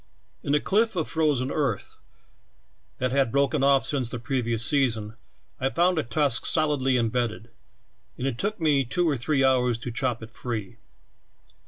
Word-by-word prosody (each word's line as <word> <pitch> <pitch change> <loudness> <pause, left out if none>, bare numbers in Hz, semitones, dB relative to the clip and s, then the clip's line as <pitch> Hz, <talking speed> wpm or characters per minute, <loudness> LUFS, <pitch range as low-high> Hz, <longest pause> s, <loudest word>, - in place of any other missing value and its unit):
In 140 - 0
a - - +3
cliff 220 +6 +1
of 160 -4 -1
frozen 145 -5 0
earth, 135 -10 -2 1.0
that 130 0 -1
hab 135 -3 +2
broken 140 +1 +1
off 140 -1 +4
since 130 -5 -1
the 120 - -4
previous 120 -1 -2
sea 140 -3 +3
son, 110 -1 -5 0.4
I 130 - +1
found 175 +3 +2
a - - 0
tusk 140 0 0
solidly 145 -5 +2
em 115 -2 +1
bedded 115 -1 -3 0.7
and - - -4
it 130 -4 -2
took 210 +1 -2
me 150 -4 +3
two 175 +8 0
or 150 - +2
three 135 +3 0
hours 125 -3 +3
to 120 +1 -6
chop 120 -1 -2
it 110 +1 -11
free. 110 -7 -5
135 Hz, 175 wpm, -25 LUFS, 120-150 Hz, 1.0 s, off